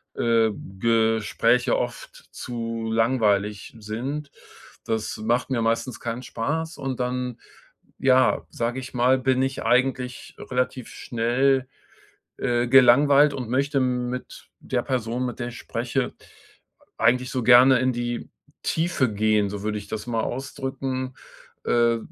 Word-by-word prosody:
äh, 115 -1 +3 0.3
Gespräche 115 +2 +2
oft 120 0 -6
zu 115 -2 -4
langweilig 105 -4 +1
sind. 130 +8 -5 0.6
Das 110 -1 -2
macht 120 +4 0
mir 125 -3 0
meistens 115 +1 -1
keinen 120 +1 -4
Spaß 160 +10 -3
und 135 -3 -4
dann, 125 -1 -2 0.6
ja, 130 -1 +3
sage 120 +2 -2
ich 130 0 -9
mal, 125 +2 +3
bin 130 0 +1
ich 135 0 -2
eigentlich 125 +1 0
relativ 125 -1 -2
schnell, 130 +3 0 0.7
äh, 120 0 0
gelangweilt 140 +3 +6
und 125 -4 -5
möchte 140 +2 +1
mit 125 0 -3
der - - -2
Person, 125 0 -2
mit 125 - -6
der 120 - -2
ich 120 - -9
spreche, 125 +2 -2 0.9
eigentlich 125 +2 +2
so 130 - -2
gerne 125 +2 +7
in 130 0 +1
die 120 0 -4 0.3
Tiefe 160 -8 0
gehen, 105 -1 +2
so 100 0 -6
würde 105 0 -1
ich 100 -1 -10
das 110 +1 -5
mal 115 -2 -1
ausdrücken, 130 0 -4 0.5
äh, 115 -1 +3
125 Hz, 130 wpm, -24 LUFS, 115-130 Hz, 0.9 s, gerne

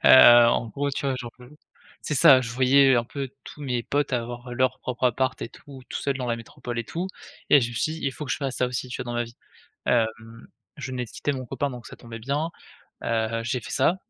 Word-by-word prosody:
Heu, - - +7 0.4
en 120 - +1
gros, 140 +6 -2
tu 140 - -3
vois 135 - +1
genre, 120 -1 -7
heu, 125 +5 -14 0.5
c'est 150 - -2
ça, 130 -1 +8
je 115 - -4
voyais 130 +2 +5
un 120 - +1
peu 135 +1 -5
tous - - -11
mes 125 -4 -1
potes 145 +3 -1
avoir 120 +1 -3
leur 130 +1 +1
propre 125 0 -3
appart 130 +2 +1
et - - -4
tout, 135 +3 -13
tout - - -4
seul 140 -1 -1
dans 130 -2 -4
la 115 -1 0
métropole 120 +1 -7
et 115 - -2
tout, 175 +10 -4 0.4
et 145 - +8
je 120 - 0
me - - -8
suis 155 +7 0
dit: 160 - -8
«Il 135 - 0
faut 150 - -6
que 130 - -6
je - - 0
fasse 135 -3 -3
ça 125 - +2
aussi, 125 0 -4
tu 125 - -4
vois, 120 - -6
dans - - -4
ma 120 - +1
vie». 115 0 -14 0.5
Hem, 115 -1 -1 0.3
je 140 -2 -5
venais 125 -1 -3
de - - -15
quitter 145 - -2
mon 130 -1 -5
copain 140 +4 -2
donc 125 -2 -9
ça - - -10
tombait 115 -1 -10
bien, 140 +7 -1 0.6
heu, 115 0 0
j'ai 120 +2 -1
fait - - -10
ça. 165 +7 +2
125 Hz, 260 wpm, -25 LUFS, 120-135 Hz, 0.6 s, ça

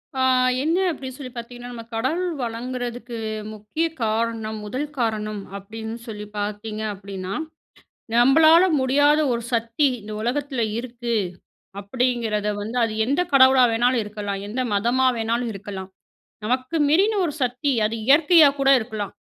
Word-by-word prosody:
ஆ 260 - -1 0.4
என்ன 325 +4 +1
அப்டி 275 -4 -7
சொல்லி 260 -2 -8
பாத்திங்கனா, 245 +1 -8
நம்ப 235 -1 -8
கடவுள் 310 +11 0
வணங்குறதுக்கு 245 0 -4 0.4
முக்கிய 215 +10 -3 0.2
காரணம், 220 0 -1
முதல் 260 +8 -3
காரணம் 215 -3 -2 0.2
அப்டின்னு 220 +3 -7
சொல்லி 210 -2 -6
பாத்தீங்க 210 +1 -4
அப்டினா, 195 -1 -6 0.8
நம்பளால 315 +8 +6 0.2
முடியாத 285 +3 +3
ஒரு 235 0 -2
சக்தி 235 +5 +1
இந்த 215 +1 -9
உலகத்தில 260 +1 -1 0.2
இருக்கு. 240 -1 -5 0.7
அப்டிங்கிறத 225 -1 -1
வந்து. 220 +4 -5
அது 225 - -2
எந்த 280 +8 +1
கடவுளா 260 -1 +7
வேணாலு 245 +3 +2
இருக்கலா, 205 -1 -5
எந்த 250 +5 -3
மதமா 240 +6 +2
வேணாலு 230 +2 -1
இருக்கலா. 195 -1 -7 0.6
நமக்கு 255 +7 -1
மீறின 390 +9 +3
ஒரு 315 - -1
சக்தி. 250 +3 0
அது 215 +2 0
இயற்கையா 300 +1 +7
கூட 275 0 +3
இருக்கலாம். 220 -3 -5
235 Hz, 130 wpm, -23 LUFS, 215-260 Hz, 0.8 s, கடவுளா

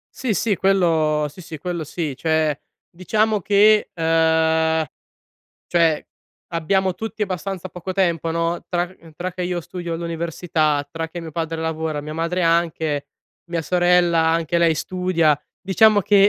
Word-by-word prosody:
Sì, 250 -5 -1
sì. 205 0 +1
Quello 160 -6 +2
sì, 165 - -16
sì, 160 -2 -8
quello 175 -1 -3
sì. 155 -2 -4
Cioè, 160 -2 +1 0.3
diciamo 210 +4 0
che 210 +2 +4
ehm, 160 -1 +2 0.8
cioè, 165 -3 +2 0.5
abbiamo 185 +3 +1
tutti 220 +3 -5
abbastanza 190 -1 -3
poco 180 +2 -6
tempo, 170 -4 +1
no, 165 +1 -1
tra 175 0 0
c 170 -3 -17
tra 180 0 -4
che 180 - -5
io 175 -1 -2
studio 175 0 -5
all'università, 165 -3 -1
tra 165 +2 -4
che 175 +1 -7
mio 160 -2 -8
padre 165 0 -3
lavora, 160 -2 -2
mia 150 +1 -7
madre 170 +3 -1
anche, 160 -3 +1 0.4
mia 170 -1 -1
sorella 175 -1 +3
anche 165 +1 +1
lei 165 -2 +4
studia, 170 -5 +1 0.2
diciamo 205 +2 +4
che 200 +1 +5
170 Hz, 145 wpm, -21 LUFS, 160-185 Hz, 0.8 s, che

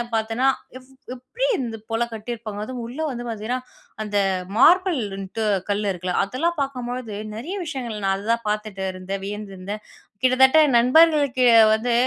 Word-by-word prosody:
பார்த்தேன்னா, 225 +4 0 0.3
"எவ் 255 0 -16 0.2
எப்பிடி 260 - -4
இந்த 235 -4 -4
போல 225 +1 0
கட்டியிருப்பாங்க?" 220 -1 -6
அதுவும் 245 +2 -6
உள்ள 245 +6 -8
வந்து 240 -1 -6
பார்த்தீங்கன்னா, 230 +3 -3 0.4
அந்த 205 -1 -2 0.4
மார்பிள்னுட்டு 225 - +2 0.2
கல் 205 +1 0
இருக்குல்ல 180 0 -3
அதெல்லாம் 300 +10 -1
பார்க்கும்பொழுது 250 -4 -4 0.2
நிறைய 295 - -5
விஷயங்கள் 240 -9 -5
நான் 195 0 +2
அதுதான் 230 +3 -1
பார்த்துட்டு 210 -2 -3
இருந்தேன். 190 +1 -5
வியந்திருந்தேன். 205 0 -6 0.4
கிட்டத்தட்ட 265 +4 +5 0.2
நண்பர்களுக்கு 280 0 +4 0.3
வந்து 235 +2 0
235 Hz, 130 wpm, -23 LUFS, 210-255 Hz, 0.4 s, கிட்டத்தட்ட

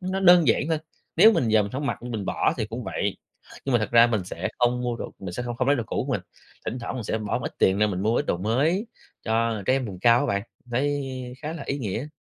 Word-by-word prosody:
nó 185 +1 -2
đơn 175 -6 +7
giản 115 - +3
thôi, 160 -1 +1 0.4
nếu 215 +7 +8
mình 125 - +1
giờ 110 -1 +4
mình 100 - -6
hổng 140 +2 -3
mặc, - - -3
mình 115 -5 -4
bỏ - - +1
thì - - -2
cũng - - -6
vậy. - - -2 0.5
Nhưng 135 - -1
mà 120 - +5
thật 105 - -2
ra 115 0 +7
mình 110 -6 -1
sẽ 90 0 -4
không 125 0 +2
mua 120 -1 -1
đồ - - -6
mình 95 -2 -6
sẽ 110 - -4
không 120 -1 -4
không 125 - 0
lấy 145 - +4
đồ 120 - -1
cũ - - -2
của - - -2
mình, - - 0 0.4
thỉnh 125 - -3
thoảng 120 - -5
mình 125 -4 -4
sẽ 110 - -1
bỏ 105 -2 -2
một - - -7
ít - - -7
tiền 95 +1 +3
ra 105 - +4
mình 95 -3 -2
mua 110 +3 +2
ít 145 - -2
đồ - - +1
mới 145 - +1 0.4
cho 115 -2 0
trẻ 130 - +4
em 135 -1 +1
vùng 95 -3 -7
cao 120 +3 +5
á 145 - 0
bạn, 100 -6 0 0.2
mình 125 - -19
thấy 130 -1 -2
khá 155 +1 -3
là 165 -4 -6
ý 140 - -2
nghĩa. 115 +2 -3
120 Hz, 295 wpm, -25 LUFS, 110-140 Hz, 0.5 s, nếu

